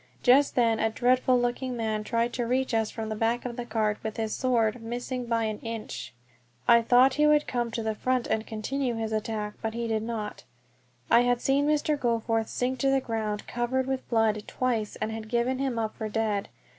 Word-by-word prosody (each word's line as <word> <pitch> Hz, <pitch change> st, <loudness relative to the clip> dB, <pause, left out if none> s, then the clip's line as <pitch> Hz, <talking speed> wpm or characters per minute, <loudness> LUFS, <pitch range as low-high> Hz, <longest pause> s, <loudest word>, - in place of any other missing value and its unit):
Just 275 Hz, +3 st, +5 dB
then 230 Hz, -3 st, +3 dB
a 225 Hz, -, +2 dB
dreadful 250 Hz, +2 st, +3 dB
looking 245 Hz, +1 st, -2 dB
man 220 Hz, -2 st, -1 dB
tried 235 Hz, +2 st, 0 dB
to 240 Hz, -2 st, -2 dB
reach 260 Hz, +1 st, 0 dB
us 220 Hz, -1 st, +1 dB
from 220 Hz, -1 st, -5 dB
the 215 Hz, -, -2 dB
back 230 Hz, +3 st, 0 dB
of 240 Hz, -1 st, -4 dB
the 245 Hz, -1 st, -5 dB
cart 215 Hz, -2 st, 0 dB
with 220 Hz, -1 st, -5 dB
his 220 Hz, -1 st, -2 dB
sword, 235 Hz, -3 st, +1 dB
missing 245 Hz, +2 st, -4 dB
by 230 Hz, -1 st, +1 dB
an 215 Hz, -1 st, -2 dB
inch. 230 Hz, -1 st, -6 dB, 0.6 s
I 235 Hz, 0 st, +7 dB
thought 250 Hz, +3 st, +5 dB
he 300 Hz, +2 st, +3 dB
would 300 Hz, 0 st, +4 dB
come 240 Hz, -1 st, -1 dB
to 230 Hz, 0 st, -3 dB
the 220 Hz, 0 st, 0 dB
front 255 Hz, +2 st, 0 dB
and 220 Hz, 0 st, -1 dB
continue 240 Hz, +3 st, -2 dB
his 220 Hz, -1 st, -3 dB
attack, 215 Hz, -1 st, -2 dB
but 225 Hz, 0 st, -3 dB
he 235 Hz, 0 st, -2 dB
did 220 Hz, -1 st, 0 dB
not. 220 Hz, -2 st, -5 dB, 0.7 s
I 235 Hz, -, +8 dB
had 245 Hz, 0 st, +2 dB
seen 275 Hz, +3 st, +2 dB
Mr. 300 Hz, 0 st, +1 dB
Goforth 225 Hz, -2 st, 0 dB
sink 255 Hz, +1 st, -2 dB
to 270 Hz, -, +2 dB
the 270 Hz, 0 st, +3 dB
ground 220 Hz, -4 st, -3 dB
covered 240 Hz, +2 st, -1 dB
with 265 Hz, 0 st, -3 dB
blood 225 Hz, -2 st, +2 dB
twice, 230 Hz, -5 st, -1 dB
and 220 Hz, -, -3 dB
had 220 Hz, 0 st, -6 dB
given 240 Hz, +2 st, 0 dB
him 265 Hz, -3 st, -1 dB
up 220 Hz, -1 st, -1 dB
for 220 Hz, -1 st, -4 dB
dead. 210 Hz, -2 st, -1 dB
235 Hz, 210 wpm, -27 LUFS, 220-250 Hz, 0.7 s, I